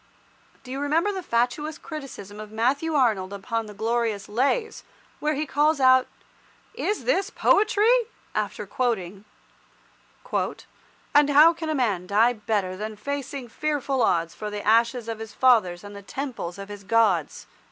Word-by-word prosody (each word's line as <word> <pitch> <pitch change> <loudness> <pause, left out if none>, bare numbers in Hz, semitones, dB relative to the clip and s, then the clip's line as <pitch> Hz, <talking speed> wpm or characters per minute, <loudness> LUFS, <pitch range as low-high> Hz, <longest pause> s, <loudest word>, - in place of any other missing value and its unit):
Do 255 - -10
you 270 - -3
remember 315 +8 +1
the 385 -2 -4
fatuous 295 +3 -1
criticism 260 - -9
of 215 0 -8
Matthew 275 +8 0
Arnold 215 -9 +2
upon 225 +3 -3
the 210 - -9
glorious 225 -2 -1
"Lays," 275 - 0 0.4
where 300 0 0
he 300 +3 -1
calls 295 +1 +2
out 260 -1 +5 0.7
"is 420 - -2
this 395 -5 +1
poetry?" 445 +3 +3 0.3
after 210 -1 -2
quoting— 200 -3 -2 1.9
"And 290 0 +5
how 300 +4 +7
can 315 -2 -3
man 200 -8 0
die 225 +5 +4
better 205 -4 -2
Than 215 +2 -5
facing 275 +2 -5
fearful 280 0 -1
odds 165 -6 +1
For 210 - -6
the 210 0 -6
ashes 230 +2 +3
of 225 -1 -4
his 225 -1 -8
fathers 210 -9 +3
And 205 0 -10
the 200 - -8
Temples 230 -6 -5
of 200 0 -8
his 205 -1 -9
Gods?" 200 -6 +1
235 Hz, 150 wpm, -25 LUFS, 205-290 Hz, 1.9 s, how